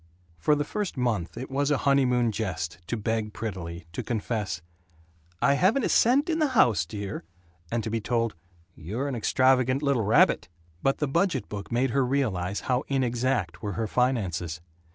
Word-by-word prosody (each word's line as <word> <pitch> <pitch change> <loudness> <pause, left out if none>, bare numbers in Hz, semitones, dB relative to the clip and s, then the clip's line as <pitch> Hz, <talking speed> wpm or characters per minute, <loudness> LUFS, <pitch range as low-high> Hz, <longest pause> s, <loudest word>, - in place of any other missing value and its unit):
For 150 - +3
the 145 - 0
first 200 +2 -4
month 115 -9 -1
it 130 +2 -6
was 140 +1 +1
a 145 - +3
honeymoon 125 -4 +3
jest 90 -6 -3
to 120 - -2
beg 110 0 -2
prettily, 85 -6 -5
to - - -3
confess, 105 -7 -3 0.8
"I 140 - +5
haven't 195 - +3
a - - +1
cent 265 +6 +4
in 325 -1 0
the 310 - +3
house, 90 - +4
dear," 100 0 -5 0.5
and 115 -1 0
to 110 - -3
be 115 0 -1
told, 115 -1 0 0.4
"You're 105 - -4
an 140 - -3
extravagant 130 +3 +2
little 140 -4 +2
rabbit." 105 -3 +3 0.3
But 135 - +2
the 150 - 0
budget 165 -1 0
book 100 +1 -6
made 125 +2 +1
her 135 +1 +2
realize 105 -8 -1
how 125 0 0
inexact 125 -7 0
were 105 -1 -3
her 110 +5 -1
finances. 95 -10 0
120 Hz, 175 wpm, -27 LUFS, 100-135 Hz, 0.8 s, I